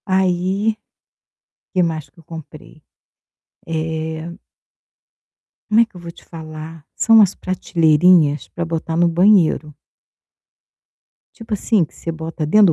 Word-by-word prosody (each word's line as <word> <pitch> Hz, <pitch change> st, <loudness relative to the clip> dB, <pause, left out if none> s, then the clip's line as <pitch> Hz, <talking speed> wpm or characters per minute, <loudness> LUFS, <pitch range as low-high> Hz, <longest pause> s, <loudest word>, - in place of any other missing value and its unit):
Aí, 190 Hz, +2 st, 0 dB, 1.0 s
que 185 Hz, -, +2 dB
mais 160 Hz, -3 st, -2 dB
que -, -, -32 dB
eu -, -, -22 dB
comprei? 155 Hz, -1 st, -12 dB, 0.8 s
Eh 160 Hz, 0 st, -4 dB, 1.4 s
como 220 Hz, +1 st, +5 dB
é -, -, +4 dB
que 225 Hz, -, -33 dB
eu 175 Hz, -, -10 dB
vou 170 Hz, 0 st, -8 dB
te -, -, -18 dB
falar? 155 Hz, -1 st, -10 dB
São 225 Hz, -, +4 dB
umas 200 Hz, -4 st, +5 dB
prateleirinhas 165 Hz, -3 st, +2 dB
para 170 Hz, -, -4 dB
botar 165 Hz, 0 st, -3 dB
no 175 Hz, 0 st, +4 dB
banheiro. 170 Hz, -3 st, +3 dB, 1.6 s
Tipo, 225 Hz, -2 st, -7 dB
assim, 210 Hz, -3 st, +1 dB
que -, -, -25 dB
você 165 Hz, -, -5 dB
bota 160 Hz, 0 st, -5 dB
dentro 205 Hz, +6 st, +5 dB
170 Hz, 125 wpm, -19 LUFS, 160-190 Hz, 1.6 s, como